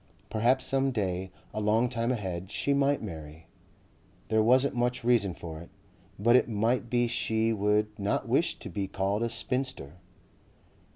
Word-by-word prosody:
Perhaps 120 Hz, +4 st, +2 dB
some 135 Hz, 0 st, +2 dB
day, 95 Hz, -6 st, -2 dB, 0.2 s
a 110 Hz, -, -2 dB
long 110 Hz, +3 st, +3 dB
time 120 Hz, 0 st, -1 dB
ahead, 95 Hz, -5 st, -4 dB
she 140 Hz, -, 0 dB
might 140 Hz, -1 st, +2 dB
marry. 80 Hz, -4 st, -8 dB, 0.8 s
There 110 Hz, 0 st, +3 dB
wasn't 130 Hz, +5 st, +4 dB
much 125 Hz, 0 st, -1 dB
reason 115 Hz, -7 st, +2 dB
for 80 Hz, -3 st, -8 dB
it, 85 Hz, -, -12 dB, 0.5 s
but 115 Hz, +4 st, +4 dB
it 125 Hz, -, +4 dB
might 115 Hz, +3 st, 0 dB
be 120 Hz, 0 st, +2 dB
she 115 Hz, -1 st, 0 dB
would 105 Hz, 0 st, 0 dB
not 100 Hz, +1 st, -1 dB
wish -, -, +1 dB
to -, -, -8 dB
be 100 Hz, -1 st, -2 dB
called 100 Hz, +3 st, -1 dB
a 115 Hz, -, 0 dB
spinster. 125 Hz, -, -3 dB
110 Hz, 160 wpm, -29 LUFS, 100-125 Hz, 0.8 s, wasn't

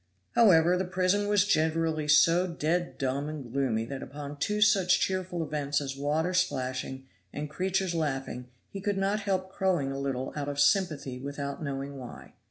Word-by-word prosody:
However, 180 Hz, -6 st, +5 dB
the 190 Hz, -, -1 dB
prison 185 Hz, +3 st, +1 dB
was 205 Hz, -1 st, +3 dB
generally 160 Hz, -3 st, +1 dB
so 165 Hz, +4 st, +5 dB
dead 170 Hz, +1 st, -1 dB
dumb 140 Hz, +2 st, -1 dB
and 140 Hz, -6 st, -7 dB
gloomy 125 Hz, -5 st, 0 dB
that 135 Hz, +2 st, -6 dB
upon 145 Hz, +1 st, -8 dB
two 210 Hz, +7 st, 0 dB
such 195 Hz, -4 st, +4 dB
cheerful 185 Hz, -2 st, -1 dB
events 145 Hz, -2 st, -1 dB
as 135 Hz, -2 st, -4 dB
water 150 Hz, +5 st, 0 dB
splashing 130 Hz, -6 st, -1 dB, 0.3 s
and 150 Hz, 0 st, -5 dB
creatures 190 Hz, +2 st, 0 dB
laughing 135 Hz, -5 st, -3 dB, 0.2 s
he 195 Hz, -, -6 dB
could 205 Hz, 0 st, -1 dB
not 195 Hz, +2 st, +1 dB
help 190 Hz, -2 st, -2 dB
crowing 180 Hz, -8 st, 0 dB
a 135 Hz, -, -4 dB
little 135 Hz, -2 st, -3 dB
out 145 Hz, -1 st, -3 dB
of 140 Hz, 0 st, -4 dB
sympathy 145 Hz, -6 st, +2 dB
without 140 Hz, +1 st, -5 dB
knowing 140 Hz, -1 st, -4 dB
why. 125 Hz, -2 st, -10 dB
155 Hz, 170 wpm, -29 LUFS, 140-185 Hz, 0.3 s, However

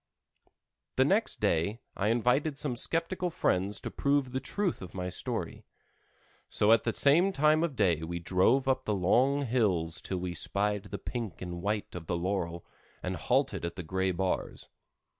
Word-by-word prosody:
The -, -, +4 dB
next -, -, +1 dB
day 85 Hz, +8 st, +1 dB, 0.2 s
I 100 Hz, -, 0 dB
invited 125 Hz, +6 st, +2 dB
some 145 Hz, -4 st, -1 dB
skeptical 165 Hz, +7 st, 0 dB
friends 100 Hz, -, 0 dB
to -, -, -5 dB
prove 140 Hz, -2 st, +1 dB
the 130 Hz, -, -1 dB
truth 200 Hz, +4 st, -2 dB
of 90 Hz, -1 st, -9 dB
my 90 Hz, -1 st, -3 dB
story. -, -, -4 dB, 0.9 s
So 105 Hz, -, +3 dB
at 115 Hz, -, +5 dB
the 115 Hz, -, +1 dB
same 170 Hz, +8 st, +4 dB
time 155 Hz, -2 st, +3 dB
of 160 Hz, -5 st, -1 dB
day 85 Hz, -8 st, +2 dB
we 85 Hz, +2 st, -4 dB
drove 95 Hz, +10 st, +2 dB
up 130 Hz, 0 st, +1 dB
the 105 Hz, -, 0 dB
long 130 Hz, +10 st, +3 dB
hills 90 Hz, -10 st, 0 dB
till 95 Hz, -, -3 dB
we 90 Hz, 0 st, -3 dB
spied 100 Hz, +3 st, -1 dB
the -, -, -5 dB
pink 115 Hz, -, -5 dB
and 90 Hz, -1 st, -6 dB
white 105 Hz, +2 st, -2 dB
of 85 Hz, -3 st, -7 dB
the 85 Hz, -, 0 dB
laurel, 85 Hz, -2 st, -2 dB, 0.4 s
and -, -, -2 dB
halted -, -, 0 dB
at 85 Hz, 0 st, -3 dB
the 90 Hz, -, -5 dB
gray 95 Hz, +3 st, 0 dB
bars. 90 Hz, +1 st, -3 dB
105 Hz, 175 wpm, -30 LUFS, 90-135 Hz, 0.9 s, at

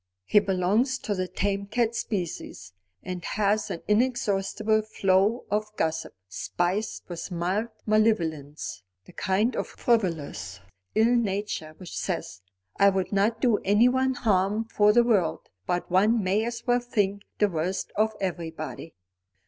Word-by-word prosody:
"He 210 Hz, -, +5 dB
belongs 205 Hz, +7 st, +1 dB
to 215 Hz, -, -3 dB
the 185 Hz, -2 st, -2 dB
tame 200 Hz, +1 st, -2 dB
cat 230 Hz, +1 st, +1 dB
species, 170 Hz, -, -4 dB, 0.3 s
and 180 Hz, -2 st, -5 dB
has 210 Hz, +2 st, 0 dB
an 170 Hz, -, -5 dB
inexhaustible 215 Hz, -2 st, +1 dB
flow 205 Hz, +2 st, +1 dB
of 215 Hz, +1 st, -1 dB
gossip, 160 Hz, -6 st, -1 dB
spiced 180 Hz, -, -2 dB
with 175 Hz, +1 st, -6 dB
mild 185 Hz, +5 st, -1 dB, 0.2 s
malevolence. 165 Hz, -, 0 dB, 0.2 s
The -, -, -16 dB
kind 210 Hz, +6 st, +1 dB
of -, -, -2 dB
frivolous 165 Hz, -, -1 dB, 0.4 s
ill 230 Hz, +3 st, +4 dB
nature 200 Hz, -8 st, -2 dB
which 185 Hz, -, -9 dB
says: 90 Hz, -, -3 dB, 0.4 s
'I 200 Hz, -, +7 dB
would 190 Hz, -1 st, -1 dB
not 215 Hz, +3 st, +1 dB
do 235 Hz, -4 st, +4 dB
anyone 250 Hz, +6 st, +3 dB
harm 210 Hz, -1 st, +1 dB
for 210 Hz, -2 st, +4 dB
the 240 Hz, +2 st, +5 dB
world, 185 Hz, -9 st, +2 dB, 0.3 s
but 175 Hz, 0 st, -1 dB
one 210 Hz, +4 st, +3 dB
may 200 Hz, +4 st, +1 dB
as 235 Hz, 0 st, -5 dB
well 245 Hz, 0 st, +3 dB
think 205 Hz, -5 st, -1 dB, 0.2 s
the 210 Hz, -, +4 dB
worst 180 Hz, +1 st, -2 dB
of 220 Hz, +1 st, +1 dB
everybody.'" 165 Hz, -3 st, -5 dB
205 Hz, 140 wpm, -26 LUFS, 180-220 Hz, 0.4 s, I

